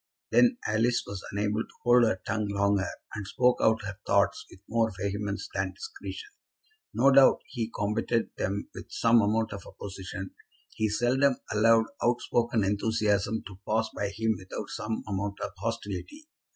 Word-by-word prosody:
Then 245 Hz, 0 st, +5 dB
Alice 115 Hz, +3 st, +2 dB
was 100 Hz, -2 st, -6 dB
unable 105 Hz, +2 st, 0 dB
to -, -, -7 dB
hold 120 Hz, 0 st, +6 dB
her 95 Hz, -4 st, 0 dB
tongue 110 Hz, 0 st, -1 dB
longer, 100 Hz, -1 st, +1 dB, 0.2 s
and 105 Hz, -2 st, -5 dB
spoke 125 Hz, +2 st, +2 dB
out 110 Hz, -1 st, +3 dB
her 100 Hz, 0 st, -6 dB
thoughts 100 Hz, -1 st, +2 dB
with -, -, -15 dB
more 115 Hz, -1 st, +1 dB
vehemence 100 Hz, +1 st, -2 dB
than -, -, -1 dB
discretion. 440 Hz, -1 st, -8 dB, 0.6 s
No 135 Hz, +3 st, +4 dB
doubt 135 Hz, 0 st, +6 dB
he 115 Hz, -3 st, -4 dB
combated 110 Hz, +2 st, -1 dB
them 100 Hz, +2 st, -2 dB
with -, -, -9 dB
some 115 Hz, 0 st, +4 dB
amount 110 Hz, +1 st, +1 dB
of 100 Hz, -, -8 dB
opposition. 95 Hz, -1 st, -7 dB, 0.4 s
He 110 Hz, 0 st, 0 dB
seldom 130 Hz, +5 st, +2 dB, 0.2 s
allowed 115 Hz, +1 st, +5 dB, 0.2 s
out 120 Hz, 0 st, +3 dB
spoken 115 Hz, -2 st, +1 dB
enthusiasm 105 Hz, +1 st, +1 dB
to 95 Hz, -1 st, -10 dB
pass 110 Hz, +1 st, +1 dB
by 100 Hz, -, -1 dB
him 110 Hz, +2 st, 0 dB
without 95 Hz, -1 st, -7 dB
some 110 Hz, +1 st, -3 dB
amount 100 Hz, 0 st, -3 dB
of -, -, -4 dB
hostility. 200 Hz, -, -5 dB
110 Hz, 160 wpm, -28 LUFS, 100-115 Hz, 0.6 s, hold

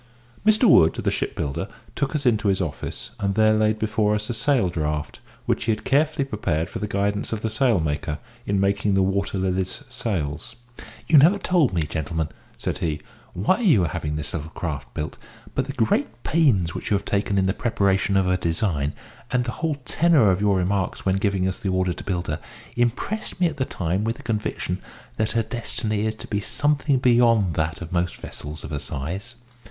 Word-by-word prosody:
Mr 215 Hz, +3 st, +4 dB
Wood, 80 Hz, -, +6 dB
the -, -, 0 dB
shipbuilder, 70 Hz, -1 st, -2 dB, 0.3 s
took 140 Hz, +1 st, -1 dB
us 145 Hz, -2 st, -1 dB
into 110 Hz, -4 st, +3 dB
his 95 Hz, -1 st, +2 dB
office, 80 Hz, -6 st, -4 dB
and 100 Hz, -1 st, 0 dB
there 110 Hz, 0 st, +5 dB
laid 110 Hz, 0 st, +2 dB
before 105 Hz, -1 st, +1 dB
us 105 Hz, +2 st, -2 dB
a -, -, -1 dB
sail 125 Hz, -2 st, +2 dB
draught, 75 Hz, -3 st, -3 dB, 0.3 s
which -, -, 0 dB
he 115 Hz, -, +2 dB
had 105 Hz, -, -2 dB
carefully 150 Hz, +1 st, +2 dB
prepared 85 Hz, -, -2 dB
for -, -, -4 dB
the 105 Hz, -, -2 dB
guidance 100 Hz, +1 st, -1 dB
of 110 Hz, -2 st, -2 dB
the 110 Hz, -, -1 dB
sailmaker, 80 Hz, -, +1 dB, 0.3 s
in 100 Hz, -1 st, +1 dB
making 100 Hz, +1 st, +2 dB
the 95 Hz, -, +4 dB
Water 100 Hz, +1 st, 0 dB
Lily's 95 Hz, +6 st, -1 dB
sails. 100 Hz, -, -3 dB, 0.5 s
"You 155 Hz, -2 st, +7 dB
have -, -, +8 dB
never 175 Hz, +8 st, +6 dB
told 180 Hz, -, +2 dB
me, 85 Hz, -4 st, 0 dB
gentlemen," 80 Hz, +1 st, -2 dB, 0.3 s
said -, -, -3 dB
he, 75 Hz, -3 st, -2 dB, 0.3 s
"why 105 Hz, -, +2 dB
you 170 Hz, -, +4 dB
are -, -, -1 dB
having 75 Hz, -2 st, -3 dB
this 75 Hz, -1 st, -4 dB
little 80 Hz, -1 st, -4 dB
craft 75 Hz, -7 st, -5 dB
built; 75 Hz, -1 st, -4 dB, 0.3 s
but 130 Hz, -, 0 dB
the 140 Hz, -, -5 dB
great 115 Hz, -1 st, 0 dB
pains 115 Hz, -, +3 dB
which -, -, -5 dB
you 105 Hz, -, +3 dB
have 100 Hz, -, -8 dB
taken 100 Hz, 0 st, 0 dB
in 95 Hz, -, +3 dB
the 95 Hz, -, +2 dB
preparation 100 Hz, -4 st, +1 dB
of 95 Hz, -, +3 dB
her 90 Hz, 0 st, +2 dB
design, 80 Hz, -4 st, 0 dB, 0.4 s
and 125 Hz, 0 st, +1 dB
the 120 Hz, -, -3 dB
whole 160 Hz, -2 st, +1 dB
tenour 155 Hz, -, +4 dB
of 95 Hz, +2 st, 0 dB
your 100 Hz, -2 st, +3 dB
remarks 95 Hz, +1 st, -1 dB
when 95 Hz, 0 st, +2 dB
giving 95 Hz, -2 st, +1 dB
us 95 Hz, +3 st, -2 dB
the 100 Hz, -5 st, -2 dB
order 95 Hz, -1 st, +1 dB
to -, -, -9 dB
build 90 Hz, -3 st, -2 dB
her, 75 Hz, -, -2 dB, 0.4 s
impressed 120 Hz, -, -1 dB
me 180 Hz, -, +4 dB
at 160 Hz, -3 st, -1 dB
the 130 Hz, -, 0 dB
time 90 Hz, 0 st, -1 dB
with 115 Hz, +1 st, -1 dB
a -, -, -11 dB
conviction 105 Hz, -4 st, -2 dB, 0.4 s
that 110 Hz, 0 st, 0 dB
her 115 Hz, -1 st, +2 dB
destiny 110 Hz, -2 st, -1 dB
is 110 Hz, -, -1 dB
to -, -, -8 dB
be 100 Hz, -, -1 dB
something 145 Hz, +4 st, +1 dB
beyond 115 Hz, -7 st, +4 dB
that 80 Hz, +2 st, -1 dB
of 80 Hz, -, -9 dB
most 90 Hz, -1 st, 0 dB
vessels 75 Hz, +1 st, -7 dB
of -, -, -7 dB
her 75 Hz, -, -2 dB
size. 95 Hz, -, -4 dB
100 Hz, 205 wpm, -24 LUFS, 90-120 Hz, 0.5 s, have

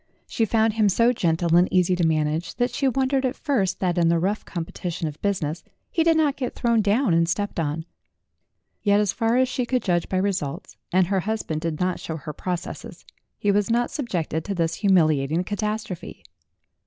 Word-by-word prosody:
She 230 Hz, -, 0 dB
found 220 Hz, 0 st, +2 dB
him 215 Hz, -2 st, +3 dB
so 230 Hz, +5 st, +3 dB
gentle 170 Hz, -4 st, +1 dB
and 175 Hz, +1 st, +4 dB
easy 180 Hz, 0 st, +3 dB
to 175 Hz, -, 0 dB
manage, 160 Hz, +2 st, -1 dB
that 245 Hz, +1 st, 0 dB
she 275 Hz, -, 0 dB
wondered 265 Hz, +1 st, +1 dB
at 260 Hz, +1 st, 0 dB
first 215 Hz, -, 0 dB
that 180 Hz, -2 st, +1 dB
in 170 Hz, -, +3 dB
the 170 Hz, -, +3 dB
rough 195 Hz, +5 st, -1 dB
competition 170 Hz, -1 st, -4 dB
of 150 Hz, 0 st, -8 dB
business 175 Hz, -5 st, -1 dB, 0.3 s
he 330 Hz, -, +2 dB
did 330 Hz, -1 st, +4 dB
not 295 Hz, -3 st, +2 dB
get 255 Hz, -3 st, -4 dB
thrown 235 Hz, -2 st, +2 dB
down 210 Hz, 0 st, +2 dB
and 165 Hz, 0 st, +3 dB
stepped 205 Hz, +1 st, -2 dB
on. 160 Hz, 0 st, -2 dB, 1.0 s
Yet, 205 Hz, -1 st, +3 dB
as 205 Hz, -2 st, +1 dB
far 230 Hz, +1 st, +1 dB
as 260 Hz, 0 st, +3 dB
she 255 Hz, 0 st, -2 dB
could 250 Hz, +1 st, -1 dB
judge 175 Hz, -3 st, 0 dB
by 190 Hz, -, 0 dB
results 185 Hz, -7 st, -2 dB, 0.2 s
and 185 Hz, 0 st, +4 dB
her 190 Hz, +2 st, 0 dB
husband 190 Hz, -6 st, -3 dB
did 165 Hz, -2 st, -3 dB
not 180 Hz, 0 st, 0 dB
show 160 Hz, -, -5 dB
her 150 Hz, 0 st, -7 dB
processes 185 Hz, +4 st, -6 dB, 0.3 s
he 205 Hz, -, +1 dB
was 205 Hz, +1 st, +1 dB
not 240 Hz, +1 st, +1 dB
subjected 175 Hz, -, -2 dB
to 200 Hz, -, -3 dB
this 165 Hz, -2 st, 0 dB
humiliating 160 Hz, -5 st, +2 dB
catastrophe. 205 Hz, -, -4 dB
190 Hz, 195 wpm, -24 LUFS, 170-225 Hz, 1.0 s, and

